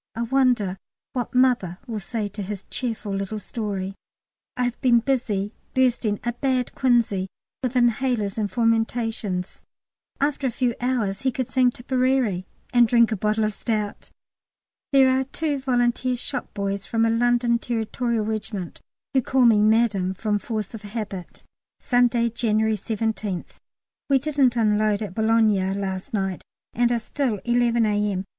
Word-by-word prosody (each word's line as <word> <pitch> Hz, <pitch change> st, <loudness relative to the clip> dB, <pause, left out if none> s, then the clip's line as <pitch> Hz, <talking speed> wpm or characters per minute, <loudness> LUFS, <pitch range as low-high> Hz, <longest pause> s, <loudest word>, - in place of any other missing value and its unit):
I 230 Hz, -, -1 dB
wonder 240 Hz, -7 st, +2 dB, 0.3 s
what 250 Hz, -2 st, -3 dB
"Mother" 245 Hz, -9 st, +3 dB
will 225 Hz, -4 st, -4 dB
say 210 Hz, +1 st, -3 dB
to 205 Hz, +1 st, -7 dB
his 195 Hz, 0 st, -5 dB
cheerful 225 Hz, -5 st, -3 dB
little 195 Hz, +2 st, -3 dB
story. 200 Hz, -2 st, -4 dB, 0.6 s
I 250 Hz, -, +1 dB
have 245 Hz, -1 st, -2 dB
been 240 Hz, -2 st, +5 dB
busy 225 Hz, -5 st, -1 dB, 0.2 s
bursting 240 Hz, -5 st, +2 dB
a 240 Hz, +1 st, -1 dB
bad 255 Hz, 0 st, -1 dB
quinsy 235 Hz, -7 st, +2 dB, 0.3 s
with 255 Hz, -1 st, -2 dB
inhalers 240 Hz, -4 st, +1 dB
and 210 Hz, -1 st, 0 dB
fomentations. 225 Hz, -4 st, -1 dB, 0.6 s
After 280 Hz, -1 st, 0 dB
a -, -, +1 dB
few 240 Hz, 0 st, 0 dB
hours 230 Hz, -6 st, 0 dB
he 265 Hz, -, +1 dB
could 255 Hz, -1 st, -3 dB
sing 255 Hz, -1 st, +4 dB
Tipperary 250 Hz, -6 st, 0 dB, 0.3 s
and 240 Hz, -1 st, +6 dB
drink 235 Hz, 0 st, +4 dB
a -, -, +1 dB
bottle 215 Hz, +2 st, 0 dB
of 215 Hz, 0 st, 0 dB
stout! 210 Hz, -1 st, -3 dB, 0.8 s
There 270 Hz, -1 st, +6 dB
are 260 Hz, 0 st, +3 dB
two 290 Hz, +2 st, -2 dB
Volunteer 250 Hz, -1 st, +1 dB
shop 245 Hz, -, -4 dB
boys 200 Hz, 0 st, -2 dB
from 225 Hz, -1 st, +2 dB
a -, -, +3 dB
London 240 Hz, 0 st, +2 dB
Territorial 235 Hz, -1 st, -1 dB
Regiment, 215 Hz, -4 st, -4 dB, 0.3 s
who 265 Hz, -, +4 dB
call 255 Hz, +1 st, +2 dB
me 220 Hz, -3 st, +6 dB
"Madam" 210 Hz, -4 st, +2 dB
from 210 Hz, +1 st, 0 dB
force 215 Hz, -2 st, -4 dB
of 225 Hz, -, -7 dB
habit. 205 Hz, -4 st, -6 dB, 0.4 s
Sunday, 245 Hz, -1 st, +2 dB
January 220 Hz, -1 st, +1 dB
17th. 215 Hz, -2 st, -3 dB, 0.5 s
We 275 Hz, -, +5 dB
didn't 275 Hz, -3 st, +2 dB
unload 215 Hz, -1 st, +2 dB
at 200 Hz, -, -6 dB
Boulogne 215 Hz, -3 st, +2 dB
last 190 Hz, -1 st, -4 dB
night, 190 Hz, -4 st, -2 dB, 0.3 s
and 240 Hz, +1 st, +2 dB
are 240 Hz, -, +2 dB
still 235 Hz, -2 st, -2 dB
(11 240 Hz, -1 st, +3 dB
A.M.) 205 Hz, -2 st, 0 dB
230 Hz, 150 wpm, -24 LUFS, 205-245 Hz, 0.8 s, and